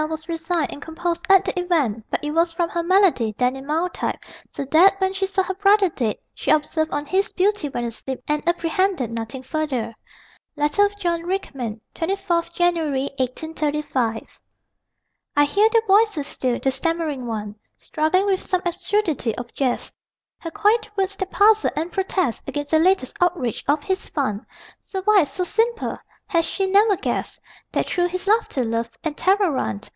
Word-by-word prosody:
was 315 Hz, 0 st, -5 dB
resigned 330 Hz, -2 st, -1 dB
and 285 Hz, -, -10 dB
composed 340 Hz, +2 st, -3 dB
at 390 Hz, 0 st, +6 dB
the -, -, -1 dB
event, 295 Hz, -, 0 dB
but -, -, -2 dB
it 295 Hz, -, -2 dB
was 335 Hz, +2 st, +2 dB
from 335 Hz, 0 st, -1 dB
her 340 Hz, -, -1 dB
malady, 340 Hz, -, +3 dB
then 250 Hz, +1 st, +1 dB
in 270 Hz, +1 st, -9 dB
mild 330 Hz, +4 st, 0 dB
type, -, -, -2 dB, 0.3 s
so 280 Hz, -, -4 dB
that 360 Hz, +8 st, +5 dB
when 380 Hz, 0 st, +1 dB
she 390 Hz, 0 st, -1 dB
saw 385 Hz, 0 st, +1 dB
her 380 Hz, -, -3 dB
brother 400 Hz, 0 st, +4 dB
dead, 235 Hz, -9 st, -1 dB, 0.2 s
she -, -, -5 dB
observed 315 Hz, +1 st, +2 dB
on 290 Hz, -, -2 dB
his 390 Hz, +6 st, 0 dB
beauty 385 Hz, -5 st, +1 dB
when 240 Hz, -3 st, -3 dB
asleep 240 Hz, +3 st, -5 dB
and 300 Hz, 0 st, 0 dB
apprehended 345 Hz, -, 0 dB
nothing 230 Hz, +3 st, -5 dB
further. 260 Hz, -6 st, -2 dB, 0.6 s
Letter 300 Hz, +8 st, +3 dB
of 410 Hz, 0 st, -12 dB
John 340 Hz, -3 st, 0 dB
Rickman, 275 Hz, -, -4 dB
24 360 Hz, 0 st, 0 dB
January, 325 Hz, -6 st, 0 dB
1835. 280 Hz, -3 st, -2 dB, 1.0 s
I 290 Hz, 0 st, +5 dB
hear 410 Hz, +9 st, +3 dB
their 455 Hz, 0 st, +3 dB
voices 405 Hz, -7 st, +3 dB
still: 250 Hz, -3 st, -1 dB
the 270 Hz, -, +1 dB
stammering 300 Hz, -2 st, -1 dB
one 210 Hz, -2 st, -4 dB, 0.2 s
Struggling 315 Hz, +5 st, +1 dB
with 390 Hz, -1 st, +1 dB
some 370 Hz, -1 st, -1 dB
absurdity 345 Hz, -, 0 dB
of 240 Hz, -1 st, -7 dB
jest; 260 Hz, -3 st, -1 dB, 0.5 s
Her 330 Hz, -, -6 dB
quiet 430 Hz, +5 st, +2 dB
words 390 Hz, 0 st, 0 dB
that 380 Hz, -, -3 dB
puzzle 430 Hz, +2 st, +4 dB
and 325 Hz, +4 st, -2 dB
protest 375 Hz, -, -1 dB
Against 290 Hz, -1 st, -4 dB
the 315 Hz, -, +5 dB
latest 360 Hz, -6 st, +2 dB
outrage 340 Hz, -, 0 dB
of 290 Hz, +1 st, +2 dB
his 380 Hz, 0 st, -2 dB
fun. 225 Hz, -9 st, -2 dB, 0.3 s
So 380 Hz, -1 st, -6 dB
wise, 395 Hz, -10 st, +4 dB
so 365 Hz, -, -2 dB
simple 455 Hz, +5 st, 0 dB, 0.3 s
has 335 Hz, -2 st, +1 dB
she 390 Hz, +3 st, -1 dB
never 400 Hz, +1 st, +4 dB
guessed -, -, -3 dB, 0.3 s
That -, -, 0 dB
through 355 Hz, 0 st, +1 dB
his 370 Hz, +2 st, -4 dB
laughter, 425 Hz, -, +2 dB
love 230 Hz, +1 st, -1 dB
and 315 Hz, -2 st, -2 dB
terror 380 Hz, +1 st, +2 dB
run? 110 Hz, -, -2 dB
330 Hz, 175 wpm, -22 LUFS, 275-380 Hz, 1.0 s, at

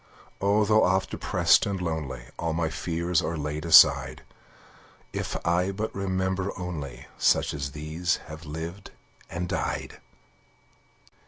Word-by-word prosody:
Oh, 100 Hz, +2 st, +3 dB
though 110 Hz, +1 st, +4 dB
oft 95 Hz, +1 st, +1 dB
depressed -, -, +3 dB
and 100 Hz, -2 st, -2 dB
lonely, 80 Hz, -8 st, -3 dB, 0.2 s
All 85 Hz, -1 st, -1 dB
my 80 Hz, -1 st, -1 dB
fears 85 Hz, 0 st, -1 dB
are 85 Hz, +1 st, -3 dB
laid 75 Hz, +1 st, -4 dB
aside, 85 Hz, -, +6 dB, 0.9 s
If -, -, -3 dB
I 90 Hz, +3 st, +2 dB
but 110 Hz, +3 st, -4 dB
remember 95 Hz, 0 st, -2 dB
only 85 Hz, -7 st, -6 dB
Such -, -, +3 dB
as 70 Hz, -1 st, -4 dB
these 80 Hz, +4 st, -1 dB
have 75 Hz, 0 st, -10 dB
lived 80 Hz, +5 st, -7 dB, 0.4 s
and 90 Hz, +1 st, -3 dB
died! -, -, -3 dB
85 Hz, 130 wpm, -26 LUFS, 80-95 Hz, 0.9 s, aside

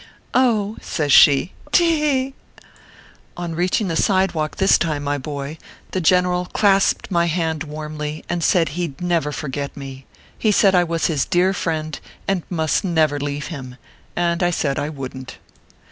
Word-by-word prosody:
" -, -, -35 dB, 0.3 s
!" 205 Hz, +1 st, -5 dB
says 150 Hz, -3 st, -2 dB
she, 145 Hz, +5 st, +6 dB
" -, -, -22 dB
te 345 Hz, -, +5 dB
he 330 Hz, -2 st, +2 dB, 0.2 s
he 270 Hz, +1 st, -8 dB, 0.5 s
!" -, -, -26 dB
On 175 Hz, -1 st, -4 dB
reaching 180 Hz, +5 st, 0 dB
the 165 Hz, -, -2 dB
sidewalk 185 Hz, -5 st, +1 dB
this 195 Hz, -, +4 dB
time, 155 Hz, -3 st, -1 dB
my 145 Hz, 0 st, -1 dB
boy, 145 Hz, +2 st, -6 dB, 0.3 s
the 185 Hz, -, -1 dB
general 180 Hz, +1 st, +2 dB
clasped 195 Hz, +1 st, +2 dB
my 170 Hz, -1 st, +2 dB
hand 160 Hz, -2 st, -1 dB
warmly, 150 Hz, 0 st, -6 dB
and 175 Hz, -1 st, -2 dB
said 165 Hz, -3 st, +3 dB
he 175 Hz, +3 st, -2 dB
d 145 Hz, +4 st, -8 dB
never 165 Hz, -4 st, 0 dB
forget 145 Hz, -1 st, -5 dB
me. 135 Hz, -1 st, -9 dB, 0.3 s
He 215 Hz, -, +2 dB
said 195 Hz, -1 st, +4 dB
I 180 Hz, -1 st, +5 dB
was 165 Hz, -1 st, -1 dB
his 150 Hz, -5 st, +1 dB
dear 180 Hz, +2 st, +2 dB
friend, 155 Hz, -4 st, -3 dB, 0.3 s
and 195 Hz, -2 st, +1 dB
must 160 Hz, 0 st, 0 dB
never 160 Hz, -5 st, +1 dB
leave 145 Hz, 0 st, -4 dB
him; 130 Hz, -4 st, -8 dB, 0.5 s
and 170 Hz, +1 st, 0 dB
I 175 Hz, -, +3 dB
said 140 Hz, -5 st, -1 dB
I 145 Hz, -, -2 dB
wouldn 130 Hz, -3 st, -7 dB
t. -, -, -9 dB
160 Hz, 180 wpm, -21 LUFS, 145-180 Hz, 0.5 s, she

